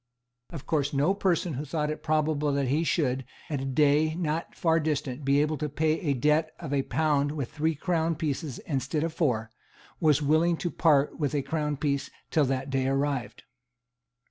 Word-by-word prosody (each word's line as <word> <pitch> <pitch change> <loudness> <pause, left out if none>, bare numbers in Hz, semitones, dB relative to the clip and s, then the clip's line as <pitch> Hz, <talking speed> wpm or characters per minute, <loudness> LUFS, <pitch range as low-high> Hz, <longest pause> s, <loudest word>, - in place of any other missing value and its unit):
Of 160 -6 -8
course 145 -2 0
no 145 +7 +3
person 180 -4 0
who 140 +3 -3
thought 150 0 -2
it 155 - -6
probable 155 -1 +1
that 140 -2 0
he 150 +5 +2
should, 135 -3 0 0.3
at 140 -3 -1
a - - -3
day 150 +3 +3
not 165 -1 -2
far 165 -1 +2
distant, 150 -3 -2
be 140 +1 +3
able 150 0 -1
to 150 -1 -2
pay 155 +2 +1
a 145 -5 0
debt 150 +5 +2
of 150 -5 -5
a 140 - +2
pound 145 +1 +1
with 140 -6 -4
three 160 +1 0
crown 165 +1 0
pieces 150 -3 -3
instead 150 +1 -1
of 165 -1 -2
four, 120 -9 0 0.5
was 150 -3 +4
willing 160 +3 +2
to 175 - -3
part 150 -3 +2
with 150 -1 0
a 140 - 0
crown 150 0 -2
piece, 140 -1 -1 0.2
till 155 -3 +3
that 135 +1 -2
day 135 -1 +1
arrived. 135 -1 -1
150 Hz, 190 wpm, -27 LUFS, 140-160 Hz, 0.5 s, was